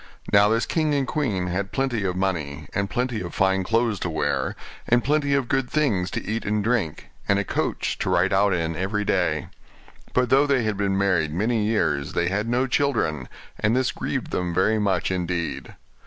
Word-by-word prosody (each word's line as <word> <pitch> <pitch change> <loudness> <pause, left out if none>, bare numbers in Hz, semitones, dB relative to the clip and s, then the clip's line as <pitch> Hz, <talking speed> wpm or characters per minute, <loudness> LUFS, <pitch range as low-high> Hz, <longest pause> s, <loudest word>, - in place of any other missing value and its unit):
Now 100 +1 +6
this 115 +1 +1
king 155 -3 0
and 140 -1 +1
queen 120 -11 -1
had 95 +2 -2
plenty 130 -6 -1
of 90 -1 -1
money, 75 -7 -2
and 100 0 -1
plenty 125 0 -1
of 85 -1 -6
fine 95 0 +2
clothes 115 0 +1
to 90 - -2
wear, 80 - -1 0.3
and 120 0 +4
plenty 145 0 +2
of 135 -3 0
good 135 -1 0
things 110 -13 +1
to - - -4
eat 110 +2 -2
and 105 0 0
drink, 110 -9 -1 0.2
and 100 - +4
a 100 - +1
coach - - -2
to - - -1
ride 90 +2 +2
out 100 +1 +3
in 80 -2 -1
every 100 +4 -1
day: 80 -7 0 0.6
but 125 -1 +1
though 140 +2 +5
they 135 -4 +2
had 110 -1 0
been 100 -1 0
married 90 -6 +1
many 110 +6 0
years 75 -10 0
they 85 0 +1
had 105 +4 -1
no 125 +2 +2
children, 120 - 0 0.3
and 105 +3 +2
this 130 -1 +1
grieved - - -4
them 90 -1 -2
very 110 +4 +2
much 95 -3 0
indeed. 85 -6 -3
100 Hz, 200 wpm, -24 LUFS, 90-120 Hz, 0.6 s, Now